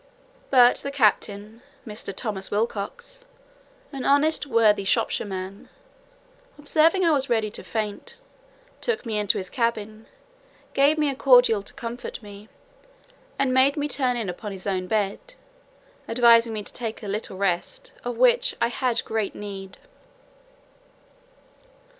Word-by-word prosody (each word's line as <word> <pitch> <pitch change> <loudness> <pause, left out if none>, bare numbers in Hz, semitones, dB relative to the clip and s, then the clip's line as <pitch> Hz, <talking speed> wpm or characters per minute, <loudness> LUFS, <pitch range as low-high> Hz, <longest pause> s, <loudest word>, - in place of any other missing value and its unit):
But 250 -2 +6
the 280 - -4
captain, 215 -3 0 0.2
Mr. 210 -3 -4
Thomas 195 -1 -4
Wilcocks, 240 - -4 0.7
an 270 -3 -6
honest 290 +2 +2
worthy 220 -5 +3
Shropshire 195 - 0
man, 190 +1 -7 0.9
observing 320 +5 +3
I 330 - +4
was 275 -3 +3
ready 220 -3 +1
to - - -8
faint, 220 - -5 0.6
took 460 - -2
me 220 -2 -1
into 205 -1 +1
his 185 -1 -5
cabin, 220 -2 -2 0.7
gave 285 +3 +3
me 300 -1 +1
a - - -6
cordial 245 -5 +5
to 200 - -12
comfort 235 +1 -6
me, 205 +1 -12 0.9
and 270 -2 +1
made 265 +3 +4
me 290 0 -1
turn 255 -4 0
in 225 -4 -3
upon 190 +4 -6
his 190 -1 -8
own 185 -2 -2
bed, 220 - -2 0.7
advising 230 0 +5
me 210 -1 -4
to - - -8
take 225 -2 -5
a - - -6
little 200 -1 -4
rest, 195 - -2
of 475 - -4
which - - +3
I 235 - +2
had 245 -1 -1
great 220 -2 -2
need. 195 -2 -8
230 Hz, 140 wpm, -24 LUFS, 205-275 Hz, 0.9 s, But